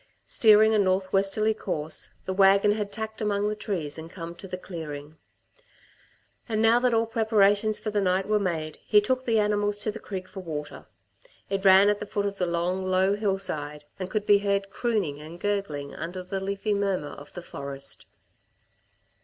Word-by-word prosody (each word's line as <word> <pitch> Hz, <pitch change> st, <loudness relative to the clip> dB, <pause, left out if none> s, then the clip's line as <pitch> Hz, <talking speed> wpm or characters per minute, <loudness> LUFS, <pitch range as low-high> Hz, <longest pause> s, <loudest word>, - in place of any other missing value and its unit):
Steering 220 Hz, 0 st, +5 dB
a 215 Hz, -, +3 dB
north 190 Hz, -1 st, +1 dB
westerly 200 Hz, +3 st, +2 dB
course, 155 Hz, -7 st, -1 dB, 0.2 s
the 190 Hz, -, -2 dB
wagon 195 Hz, +1 st, +5 dB
had 205 Hz, -1 st, -2 dB
tacked 220 Hz, +1 st, -6 dB
among 205 Hz, -1 st, 0 dB
the 210 Hz, -, -1 dB
trees 170 Hz, -8 st, -4 dB
and 160 Hz, +1 st, -8 dB
come 170 Hz, -1 st, -7 dB
to 195 Hz, +3 st, -11 dB
the 185 Hz, 0 st, -5 dB
clearing. 155 Hz, -4 st, -8 dB, 1.3 s
And 215 Hz, -1 st, 0 dB
now 225 Hz, +2 st, +5 dB
that 250 Hz, 0 st, +2 dB
all 230 Hz, 0 st, +2 dB
preparations 215 Hz, -2 st, +2 dB
for 215 Hz, -, -4 dB
the 205 Hz, -1 st, +1 dB
night 190 Hz, 0 st, +1 dB
were 210 Hz, 0 st, +2 dB
made, 160 Hz, -5 st, -3 dB
he 210 Hz, -, +5 dB
took 255 Hz, +5 st, -1 dB
the 225 Hz, -1 st, +3 dB
animals 205 Hz, -1 st, +1 dB
to 210 Hz, +1 st, -2 dB
the 225 Hz, -, -8 dB
creek 185 Hz, -2 st, -6 dB
for 190 Hz, -, -9 dB
water. 155 Hz, -5 st, -6 dB, 0.6 s
It 195 Hz, -1 st, -1 dB
ran 190 Hz, +1 st, +7 dB
at 205 Hz, 0 st, +2 dB
the 210 Hz, -, -6 dB
foot 205 Hz, 0 st, -2 dB
of 200 Hz, -1 st, -3 dB
the 180 Hz, -, +1 dB
long, 175 Hz, +2 st, -1 dB
low 185 Hz, +1 st, +2 dB
hillside 185 Hz, -8 st, -2 dB
and 185 Hz, -1 st, -4 dB
could 210 Hz, 0 st, -2 dB
be 205 Hz, -1 st, +6 dB
heard 200 Hz, -1 st, -1 dB
crooning 200 Hz, -11 st, -1 dB
and 160 Hz, +3 st, -10 dB
gurgling 160 Hz, -9 st, -2 dB
under 180 Hz, +2 st, -6 dB
the 190 Hz, +2 st, -4 dB
leafy 200 Hz, +2 st, -2 dB
murmur 195 Hz, -7 st, -1 dB
of 145 Hz, -, -12 dB
the 175 Hz, -, -8 dB
forest. 140 Hz, -3 st, -7 dB
195 Hz, 185 wpm, -26 LUFS, 175-210 Hz, 1.3 s, ran